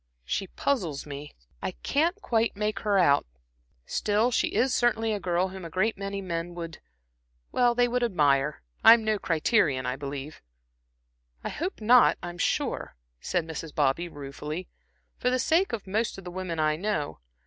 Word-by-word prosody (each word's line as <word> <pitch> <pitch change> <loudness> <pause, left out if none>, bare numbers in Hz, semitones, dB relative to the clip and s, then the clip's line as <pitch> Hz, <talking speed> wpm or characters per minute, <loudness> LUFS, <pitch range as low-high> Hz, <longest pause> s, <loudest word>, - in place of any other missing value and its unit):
She 195 - -2
puzzles 180 - -1
me; 145 0 -8 0.3
I - - -3
can't 340 +7 +1
quite 230 -2 +1
make 210 +1 -1
her 205 -2 +1
out. 145 - +4 0.6
Still, 215 +4 +1
she - - +2
is 260 +1 +1
certainly 225 -2 +2
a 205 - -2
girl 180 0 0
whom 190 0 -8
a 165 - -6
great 190 +7 +1
many 195 0 -4
men 170 -1 -4
would 165 -2 -6 0.7
would 245 0 +2
admire. 150 - +2 0.2
I'm 225 0 +8
no 215 -1 +1
criterion, 155 - +2
I 125 +1 -1
believe." 140 +1 -6 1.0
"I - - -3
hope 350 - -4
not, 240 +3 +6
I'm 175 0 -6
sure," - - -1 0.2
said 175 -3 -1
Mrs. 160 -1 -7
Bobby, 150 +3 +1
ruefully 150 +4 -6 0.5
"for 250 - +1
the 255 - +2
sake 325 +9 +2
of 230 -4 -4
most 215 +4 -1
of 195 - -9
the 180 - -7
women 180 -3 -4
I 155 0 +2
know. 170 -6 -2
185 Hz, 160 wpm, -27 LUFS, 155-225 Hz, 1.0 s, I'm